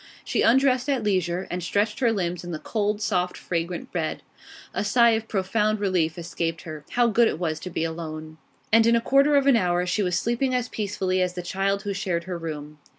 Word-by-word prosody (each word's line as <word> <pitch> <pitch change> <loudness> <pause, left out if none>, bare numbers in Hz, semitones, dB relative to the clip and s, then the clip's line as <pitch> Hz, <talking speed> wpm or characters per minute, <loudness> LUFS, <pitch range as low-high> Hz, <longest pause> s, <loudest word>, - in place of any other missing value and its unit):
She - - 0
undressed 255 +2 +3
at 265 -5 +1
leisure, 185 -3 0
and 180 +1 -2
stretched 205 +5 0
her 240 -4 +3
limbs 180 -5 -2
in 175 - -7
the 165 - -3
cold, 210 +4 -2
soft, 180 -2 0
fragrant 170 0 -4
bed. 160 -3 -2 0.5
A - - -1
sigh 235 +3 +5
of 220 0 -1
profound 210 +2 0
relief 180 -5 0
escaped 165 -1 -3
her. 155 -2 -8
How 245 0 +4
good 235 0 +4
it - - -2
was 160 -2 -2
to 185 - -6
be 165 - -2
alone! 160 -1 -6 0.3
And 225 0 +6
in 235 - +5
a - - +4
quarter 275 +5 +3
of 280 -1 +4
an 275 -2 +6
hour 180 -3 +1
she 180 +4 0
was 180 -3 +1
sleeping 250 +2 0
as 250 -1 -1
peacefully 190 -3 -1
as 180 -1 0
the 180 - -4
child 195 +2 -1
who 205 -1 -2
shared 185 -4 -2
her 180 -1 -5
room. 150 -2 -7
190 Hz, 215 wpm, -25 LUFS, 170-225 Hz, 0.5 s, And